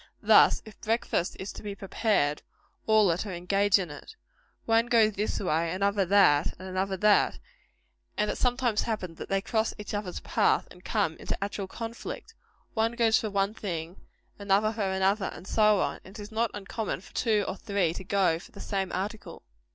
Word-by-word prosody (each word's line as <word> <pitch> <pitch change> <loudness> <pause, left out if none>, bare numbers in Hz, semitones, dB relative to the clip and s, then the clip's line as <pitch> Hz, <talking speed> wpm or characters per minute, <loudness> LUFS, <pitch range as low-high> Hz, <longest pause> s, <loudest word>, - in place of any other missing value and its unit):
Thus, - - +6
if 215 -2 -14
breakfast 220 -5 0
is 190 - -5
to - - -9
be 205 -2 -5
prepared, 195 -6 0 0.5
all 215 -4 +5
are 165 - 0
to 200 +1 -4
engage 195 +3 +2
in 180 -5 -4
it. 145 - -11 0.5
One 230 +1 +3
goes 225 -3 +4
this 205 +2 -2
way, 165 -2 0
another 200 +1 +1
that, 175 -6 +4
and 185 - -9
another 190 +1 -2
that; 210 +2 +3 0.8
and 210 0 +1
it - - -5
sometimes 245 -3 +1
happens 185 -8 -4
that - - -7
they 195 0 +1
cross 220 -1 0
each 210 -1 -7
other's 205 -3 -3
path - - +1
and 180 - -15
come 160 0 0
into - - -4
actual 200 -1 -4
conflict. 230 - -7 0.4
One 225 +1 +1
goes 230 -2 +3
for 220 - -3
one 200 +1 0
thing, 175 -5 -5 0.4
another 200 +2 +2
for 205 -3 -1
another, 190 +2 +1
and 175 - -11
so 210 0 +3
on; - - -2
and 190 +3 -12
it - - -10
is 205 +1 -8
not 225 +1 0
uncommon 205 -1 -4
for - - -17
two 215 -4 +1
or - - -3
three 200 -5 0
to 190 - -7
go 185 -4 +2
for - - -14
the 200 - -12
same 195 -2 -2
article. 205 +4 -5
200 Hz, 190 wpm, -28 LUFS, 185-220 Hz, 0.8 s, Thus